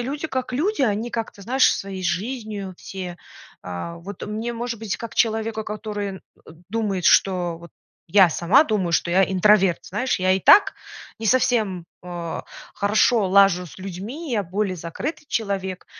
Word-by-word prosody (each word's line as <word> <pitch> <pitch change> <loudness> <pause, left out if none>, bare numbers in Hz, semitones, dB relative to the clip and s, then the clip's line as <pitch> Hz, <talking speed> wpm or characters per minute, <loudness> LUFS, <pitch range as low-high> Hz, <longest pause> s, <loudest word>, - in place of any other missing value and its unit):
люди, 285 +6 -3
как 255 -3 -3
люди, 325 - 0
они 220 +1 0
как-то, 225 -3 -5
знаешь, 260 +6 +3
своей 195 -1 -6
жизнью 200 +1 -3
все, 180 -2 -7 0.5
э. 90 - -6
Вот 200 +4 -9
мне, 220 +3 -3
может 235 -1 -4
быть, 220 -3 -3
как 230 -1 -8
человеку, 220 -1 0
который, 210 -2 -4
э, - - -10 0.5
думает, 205 -4 -2
что 175 -3 +3
вот 170 0 -13 0.4
я 190 -1 +6
сама 190 - +4
думаю, 195 - -1
что 170 - +1
я 190 +2 +4
интроверт, 190 -1 +3
знаешь, 240 +4 -1
я 185 0 +2
и 190 - +2
так 405 - +6 0.4
не 225 - -4
совсем, 215 -8 +2 0.2
э, 175 -2 -5 0.3
хорошо 210 +1 +2
лажу 190 -2 +4
с 160 - -13
людьми, 200 - -7
я 205 -3 0
более 190 +1 -2
закрытый 245 - -5
человек. 195 -4 -3
205 Hz, 160 wpm, -23 LUFS, 185-230 Hz, 0.5 s, я